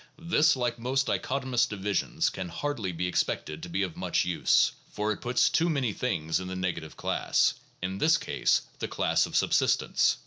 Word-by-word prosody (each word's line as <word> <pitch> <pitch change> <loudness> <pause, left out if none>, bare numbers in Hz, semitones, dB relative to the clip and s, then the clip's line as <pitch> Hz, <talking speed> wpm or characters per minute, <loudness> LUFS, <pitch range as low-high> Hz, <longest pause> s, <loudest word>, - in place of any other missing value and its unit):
This, 160 -2 +3
like 120 -2 -2
most 130 +3 0
dichotomous 130 -2 0
divisions, 105 -1 -1
can 95 -2 -5
hardly 115 - -3
be 90 +1 -3
expected 80 -3 -1
to 90 - -7
be 95 +3 0
of 90 -4 -4
much - - 0
use; 90 -1 +3 0.2
for 105 +1 -2
it 105 - -4
puts 125 +1 +2
too 170 +1 +2
many 135 -9 0
things 80 -11 -1
in 95 - -6
the 95 - -5
negative 85 -4 -4
class - - +1 0.3
(in 95 +1 -3
this 160 +1 +4
case, - - +1 0.2
the - - -2
class - - +1
of - - -12
subsistents). 65 - +2
105 Hz, 180 wpm, -28 LUFS, 90-130 Hz, 0.3 s, this